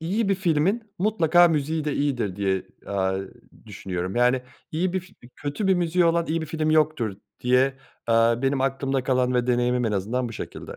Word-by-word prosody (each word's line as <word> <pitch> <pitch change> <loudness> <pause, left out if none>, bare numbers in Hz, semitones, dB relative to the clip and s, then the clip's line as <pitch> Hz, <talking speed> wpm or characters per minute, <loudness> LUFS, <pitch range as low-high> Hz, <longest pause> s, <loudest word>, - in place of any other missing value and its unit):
iyi 195 +6 -1
bir 195 - +3
filmin 185 +5 +1 0.2
mutlaka 175 -4 +4
müziği 155 0 -1
de 150 - -1
iyidir 125 -10 -1
diye, 95 -2 0 0.2
aaa, 95 -1 0 0.5
düşünüyorum. 95 -1 -5
Yani, 125 +1 +3 0.3
iyi 175 +3 0
bir 190 - 0
fi 180 - -18 0.2
kötü 145 +8 -3
bir 190 - +5
müziği 175 0 +2
olan 170 0 +2
iyi 165 +1 -1
bir 160 - -4
film 155 0 -1
yoktur 150 -10 +1 0.2
diye, 130 +2 +3 0.3
eee, 115 - +3 0.3
benim 135 0 +1
aklımda 135 0 0
kalan 125 -1 +1
ve 125 0 +1
deneyimim 125 0 +1
en 110 - 0
azından 115 +6 -1
bu - - -8
şekilde. - - -8
140 Hz, 185 wpm, -24 LUFS, 120-165 Hz, 0.5 s, bir